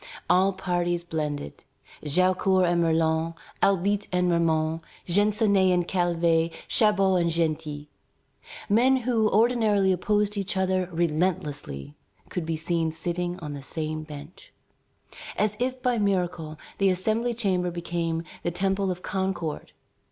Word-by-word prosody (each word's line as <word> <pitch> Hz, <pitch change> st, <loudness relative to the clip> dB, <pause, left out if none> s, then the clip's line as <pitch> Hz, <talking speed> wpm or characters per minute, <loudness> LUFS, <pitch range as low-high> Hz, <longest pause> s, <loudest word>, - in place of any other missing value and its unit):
All 190 Hz, +2 st, +4 dB
parties 175 Hz, -2 st, -1 dB
blended. 150 Hz, -, -4 dB, 0.4 s
Jaucourt 185 Hz, +4 st, +3 dB
and 170 Hz, 0 st, +2 dB
Merlin, 160 Hz, 0 st, +1 dB, 0.3 s
Albite 200 Hz, +1 st, +2 dB
and 180 Hz, -1 st, +2 dB
Ramond, 160 Hz, -1 st, +1 dB, 0.2 s
Gensonné 200 Hz, 0 st, +3 dB
and 175 Hz, -1 st, +1 dB
Calvet, 170 Hz, -2 st, +1 dB, 0.2 s
Chabot 195 Hz, -4 st, +3 dB
and 170 Hz, -, +1 dB
Genty, 155 Hz, -3 st, -2 dB, 0.8 s
men 245 Hz, +6 st, +4 dB
who 230 Hz, -3 st, +1 dB
ordinarily 215 Hz, -4 st, +3 dB
opposed 205 Hz, +3 st, 0 dB
each 195 Hz, -1 st, -2 dB
other 185 Hz, -1 st, +1 dB
relentlessly, 155 Hz, -, -2 dB, 0.4 s
could 170 Hz, -3 st, -4 dB
be 165 Hz, -, -1 dB
seen 165 Hz, 0 st, -1 dB
sitting 175 Hz, +2 st, -3 dB
on 150 Hz, -2 st, -5 dB
the 140 Hz, -, -7 dB
same 155 Hz, +2 st, -4 dB
bench. 150 Hz, +1 st, -11 dB, 0.9 s
As 210 Hz, 0 st, +1 dB
if 255 Hz, +1 st, -1 dB
by 245 Hz, -2 st, +1 dB
miracle, 180 Hz, -6 st, -1 dB, 0.2 s
the 195 Hz, -1 st, +4 dB
Assembly 220 Hz, +6 st, 0 dB
chamber 185 Hz, -6 st, 0 dB
became 170 Hz, -1 st, -2 dB, 0.2 s
the -, -, -1 dB
temple 190 Hz, +2 st, 0 dB
of 180 Hz, 0 st, -4 dB
Concord. 190 Hz, -5 st, -3 dB
180 Hz, 125 wpm, -26 LUFS, 165-195 Hz, 0.9 s, All